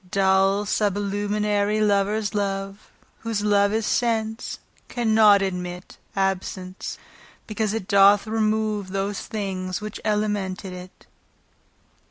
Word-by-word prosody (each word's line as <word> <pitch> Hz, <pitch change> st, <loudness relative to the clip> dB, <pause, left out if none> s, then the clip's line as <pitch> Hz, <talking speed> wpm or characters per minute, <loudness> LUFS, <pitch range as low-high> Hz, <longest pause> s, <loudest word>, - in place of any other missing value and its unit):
Dull 195 Hz, +1 st, +2 dB
sublunary 205 Hz, +1 st, 0 dB
lovers 205 Hz, 0 st, +1 dB
love 195 Hz, -1 st, -3 dB, 0.3 s
(Whose 230 Hz, -1 st, -3 dB
soule 200 Hz, -1 st, +3 dB
is 220 Hz, 0 st, 0 dB
sense) 225 Hz, -1 st, -1 dB, 0.3 s
cannot 220 Hz, -4 st, +4 dB
admit 180 Hz, -1 st, -5 dB, 0.2 s
Absence, 190 Hz, -1 st, -3 dB, 0.5 s
because 215 Hz, -1 st, -2 dB
it 190 Hz, -4 st, -4 dB
doth 200 Hz, +1 st, +5 dB
remove 215 Hz, -2 st, 0 dB
Those 195 Hz, +1 st, -2 dB
things 185 Hz, -3 st, -4 dB
which 210 Hz, 0 st, -7 dB
elemented 205 Hz, -3 st, -1 dB
it. 180 Hz, 0 st, -11 dB
205 Hz, 100 wpm, -24 LUFS, 195-215 Hz, 0.5 s, doth